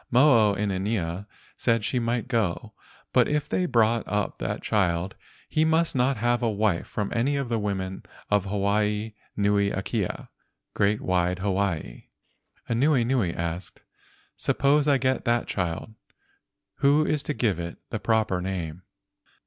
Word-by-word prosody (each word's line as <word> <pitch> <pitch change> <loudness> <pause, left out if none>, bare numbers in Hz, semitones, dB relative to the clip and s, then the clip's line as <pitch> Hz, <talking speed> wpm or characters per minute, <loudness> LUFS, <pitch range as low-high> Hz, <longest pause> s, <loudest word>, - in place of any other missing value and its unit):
Mo 120 -5 +5
o - - -3
inanea 100 -2 -2 0.3
said 115 -2 +1
she 125 +5 0
might 120 +1 -1
go, 115 -9 -1 0.4
but - - +5
if 150 -1 0
they 180 - 0
brought 115 -3 +3
up 105 -1 -2
that - - -3
child 90 -2 0 0.3
he 155 - +1
must 160 0 +2
not 130 +1 +2
have 120 +2 +1
a 115 - +2
wife 105 -4 0
from 105 -2 -3
any 130 +5 +1
of 140 -3 -2
the 115 -2 0
women 95 -2 -3 0.3
of 105 -2 +3
Hawaii 105 +2 0 0.2
nui 100 0 +2
akea 100 0 -3 0.4
(great 100 +1 +1
wide 90 0 +1
Hawaii). 95 -9 -2 0.6
Anuenue 120 - +2
asked, 85 +2 -5 0.5
"Suppose 145 +1 +2
I 140 -2 +5
get 130 0 0
that 120 0 +2
child; 90 +3 -3 0.8
who 145 +2 +4
is 150 -2 0
to 150 - -3
give 105 -8 0
it 85 0 -5
the 110 - -2
proper 105 -2 +1
name? 90 -3 -4
105 Hz, 145 wpm, -26 LUFS, 95-120 Hz, 0.8 s, Mo